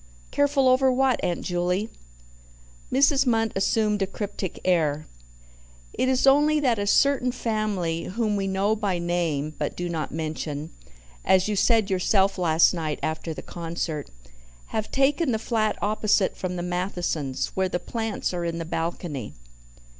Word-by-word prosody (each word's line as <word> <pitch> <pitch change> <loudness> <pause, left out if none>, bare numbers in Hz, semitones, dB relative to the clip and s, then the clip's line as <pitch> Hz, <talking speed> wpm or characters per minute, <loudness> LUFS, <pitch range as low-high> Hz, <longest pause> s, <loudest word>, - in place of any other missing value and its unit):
"Careful 285 -2 +2
over 260 +1 +4
what, 260 0 +1
Aunt 175 - -1
Juley?" 180 +3 -1 1.0
Mrs. 275 +1 +4
Munt 225 -2 +2
assumed 210 +1 +1
a 195 - +1
cryptic 195 -3 -5
air. 155 -4 +1 0.9
"It 255 - 0
is 260 0 +2
only 295 +3 +5
that 245 -7 +1
a 205 - -1
certain 265 +2 +3
family, 210 -9 -2
whom 215 +1 -1
we 195 -1 -1
know 195 +3 +1
by 205 -4 -1
name 170 -4 -1
but - - -3
do 175 - -2
not 165 -3 -3
mention, 155 -1 -4 0.5
as 190 0 +3
you 210 - 0
said 215 0 +3
yourself 190 +1 +2
last 165 -1 +4
night 160 -3 -3
after 160 +1 -2
the 155 - -7
concert, 165 -3 -4 0.6
have 220 -1 -2
taken 275 +2 +2
the 220 - +1
flat 220 -1 0
opposite 210 -1 +2
from 180 -1 -4
the 175 - -3
Mathesons 175 -6 -2
where 190 -1 0
the 175 - -1
plants 225 0 -3
are 175 -1 -2
in 170 0 -2
the 165 - -4
balcony." 165 - -4
190 Hz, 155 wpm, -25 LUFS, 170-225 Hz, 1.0 s, only